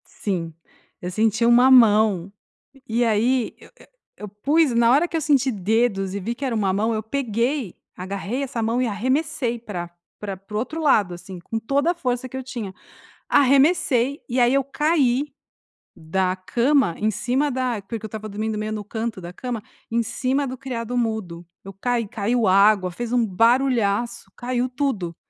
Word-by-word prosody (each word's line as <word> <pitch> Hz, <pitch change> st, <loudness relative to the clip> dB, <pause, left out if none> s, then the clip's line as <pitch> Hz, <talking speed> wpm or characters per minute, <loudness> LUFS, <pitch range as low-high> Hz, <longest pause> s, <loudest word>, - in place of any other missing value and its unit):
Sim. 175 Hz, -6 st, -4 dB, 0.5 s
Eu 180 Hz, -, -4 dB
senti 220 Hz, +3 st, +1 dB
uma 240 Hz, +2 st, +6 dB
mão 210 Hz, -6 st, +5 dB, 0.6 s
e 230 Hz, +2 st, +1 dB
aí 230 Hz, +3 st, +1 dB
eu -, -, -16 dB
eu -, -, -18 dB, 0.3 s
eu 210 Hz, -, -8 dB
pus 280 Hz, +9 st, +2 dB
na 235 Hz, 0 st, +4 dB
hora 305 Hz, +7 st, +3 dB
que 330 Hz, -, -1 dB
eu -, -, 0 dB
senti 280 Hz, -3 st, +2 dB
dedos 200 Hz, -1 st, 0 dB
e 200 Hz, -, -3 dB
vi 225 Hz, +5 st, -2 dB
que 275 Hz, +4 st, -5 dB
era 250 Hz, -3 st, -1 dB
uma 200 Hz, -3 st, +1 dB
mão, 215 Hz, +4 st, 0 dB
eu 215 Hz, 0 st, -2 dB
peguei, 240 Hz, -, -2 dB, 0.2 s
agarrei 200 Hz, +8 st, -4 dB
essa 250 Hz, -4 st, -3 dB
mão 230 Hz, +3 st, 0 dB
e 255 Hz, -, +1 dB
arremessei 255 Hz, +3 st, -1 dB
pra 180 Hz, -7 st, -6 dB, 0.3 s
pra 200 Hz, -2 st, -5 dB
para 195 Hz, +3 st, -11 dB
o -, -, +1 dB
outro 310 Hz, +8 st, -4 dB
lado, 210 Hz, -, +3 dB
assim, 180 Hz, +2 st, -9 dB
com 225 Hz, +6 st, -4 dB
toda 280 Hz, +8 st, +1 dB
a -, -, -2 dB
força 255 Hz, -6 st, -3 dB
que 260 Hz, -, -10 dB
eu 265 Hz, -, -5 dB
tinha. 235 Hz, -7 st, -6 dB, 0.6 s
Arremessei 275 Hz, -1 st, +3 dB
e 245 Hz, -, -3 dB
aí 245 Hz, +1 st, +4 dB
eu 275 Hz, 0 st, +3 dB
caí 285 Hz, -2 st, +1 dB, 0.7 s
da 185 Hz, +3 st, -1 dB
cama 235 Hz, -, +1 dB
em 215 Hz, -, +1 dB
cima 250 Hz, +8 st, 0 dB
da 250 Hz, -4 st, -2 dB
porque 220 Hz, 0 st, -5 dB
eu -, -, -3 dB
estava 215 Hz, 0 st, -7 dB
dormindo 215 Hz, +2 st, -3 dB
no 210 Hz, -, -3 dB
meio 215 Hz, 0 st, -3 dB
no 210 Hz, -1 st, -4 dB
canto 220 Hz, 0 st, -4 dB
da 175 Hz, 0 st, -7 dB
cama, 235 Hz, +1 st, -5 dB, 0.3 s
em 235 Hz, +1 st, +1 dB
cima 260 Hz, +5 st, -1 dB
do 260 Hz, -1 st, -5 dB
criado-mudo, 230 Hz, -8 st, -3 dB, 0.2 s
eu 195 Hz, -, -8 dB
caí, 235 Hz, +4 st, -1 dB
caiu 225 Hz, +3 st, 0 dB
água, 195 Hz, -1 st, +4 dB
fez 235 Hz, +6 st, -5 dB
um 240 Hz, -2 st, +3 dB
barulhaço, 235 Hz, +1 st, +1 dB
caiu 250 Hz, 0 st, -1 dB
tudo. 245 Hz, -, -2 dB
230 Hz, 185 wpm, -23 LUFS, 205-255 Hz, 0.7 s, uma